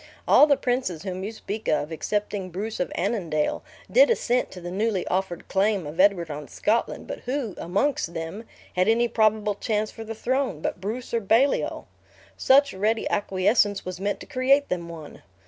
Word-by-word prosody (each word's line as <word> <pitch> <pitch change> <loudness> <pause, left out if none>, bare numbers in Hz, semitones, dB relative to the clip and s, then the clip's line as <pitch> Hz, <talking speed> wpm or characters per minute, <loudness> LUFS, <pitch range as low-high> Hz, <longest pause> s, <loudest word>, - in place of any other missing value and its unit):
All 295 - +7
the 285 -2 +4
princes 245 -10 -1
whom 185 -1 -4
you 205 - -3
speak 220 -1 -6
of, 150 +1 0
excepting 205 +3 -2
Bruce 205 +5 -5
of 180 - -1
Annandale, 170 -6 -1 0.3
did - - +6
assent 250 - +1
to 185 - -10
the 175 0 -7
newly 205 -1 0
offered 185 -2 -2
claim 195 -2 +1
of 150 +4 -8
Edward 185 -5 +3
on 145 0 -6
Scotland; 225 +3 -1
but - - -6
who, 250 -5 -2
amongst 195 0 -1
them, 165 +8 -5 0.3
had 185 +1 +2
any 235 +2 +3
probable 215 -2 +2
chance 210 +1 -2
for 225 - -8
the 225 0 -6
throne, 255 - -1
but 170 - -3
Bruce 230 +6 -5
or 230 - +2
Baliol? 230 +7 +2 0.5
Such 280 +1 +4
ready 215 +4 0
acquiescence 205 +1 +1
was 185 -1 -5
meant 200 +1 -2
to - - -8
create 275 +3 +2
them 170 -2 -3
one. 160 -3 -10
205 Hz, 180 wpm, -25 LUFS, 180-230 Hz, 0.5 s, All